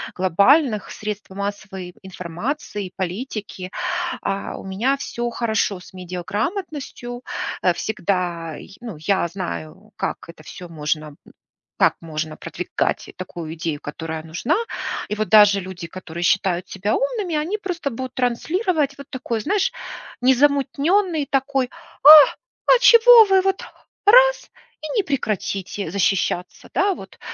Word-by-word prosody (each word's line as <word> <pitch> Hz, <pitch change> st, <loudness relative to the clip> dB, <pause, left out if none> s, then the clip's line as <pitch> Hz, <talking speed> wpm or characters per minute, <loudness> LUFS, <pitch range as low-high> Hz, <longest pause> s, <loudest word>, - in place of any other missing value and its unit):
глобальных 210 Hz, -, +3 dB
средств 210 Hz, -1 st, -6 dB
массовой 195 Hz, -2 st, -6 dB
информации 190 Hz, -, -5 dB
и -, -, -16 dB
политики. 190 Hz, -1 st, -5 dB, 0.5 s
А 195 Hz, 0 st, -3 dB
у -, -, -9 dB
меня 225 Hz, +9 st, 0 dB
всё 240 Hz, -3 st, -3 dB
хорошо 220 Hz, -5 st, 0 dB
с 180 Hz, -, -15 dB
медиаграмотностью, 240 Hz, -, -4 dB, 0.4 s
э, 180 Hz, -, +4 dB
всегда. 175 Hz, -5 st, -2 dB
Й 195 Hz, -, -13 dB
ну, 225 Hz, -10 st, -7 dB
я 190 Hz, +2 st, +1 dB
знаю, 185 Hz, +2 st, -7 dB
как -, -, -2 dB
это 170 Hz, -2 st, -12 dB
всё 180 Hz, +3 st, -9 dB
можно, 155 Hz, -1 st, -2 dB
м, 145 Hz, -, -13 dB, 0.6 s
как -, -, +4 dB
можно 155 Hz, -1 st, -5 dB
продвигать 175 Hz, +2 st, -3 dB
такую 170 Hz, -3 st, -7 dB
идею, 160 Hz, -2 st, -3 dB
которая 160 Hz, +1 st, -6 dB
нужна. 175 Hz, -, -1 dB, 0.5 s
И -, -, -1 dB
вот 215 Hz, 0 st, -1 dB
даже 205 Hz, -2 st, +7 dB
люди, 180 Hz, -2 st, -7 dB
которые 170 Hz, -1 st, -8 dB
считают 185 Hz, -1 st, +1 dB
себя 195 Hz, +2 st, -1 dB
умными, 435 Hz, -10 st, -1 dB
они 345 Hz, +8 st, -1 dB
просто 345 Hz, -7 st, -3 dB
будут 260 Hz, +1 st, -6 dB
транслировать 290 Hz, -, 0 dB
вот 280 Hz, -, -10 dB
такое, 245 Hz, -4 st, -3 dB
знаешь, 415 Hz, -, +1 dB, 0.5 s
незамутненный 285 Hz, +6 st, +2 dB
такой: 270 Hz, -2 st, 0 dB, 0.3 s
"А, 290 Hz, -, +9 dB, 0.7 s
а -, -, +5 dB
чего 485 Hz, -2 st, +9 dB
вы 385 Hz, -1 st, +4 dB
вот 385 Hz, 0 st, 0 dB, 0.4 s
раз -, -, +6 dB, 0.3 s
и 310 Hz, -, -5 dB
не -, -, +4 dB
прекратите 200 Hz, -, -2 dB
защищаться?" 185 Hz, -1 st, -1 dB
Да, 390 Hz, 0 st, +2 dB
вот. -, -, -12 dB
210 Hz, 130 wpm, -22 LUFS, 180-285 Hz, 0.7 s, А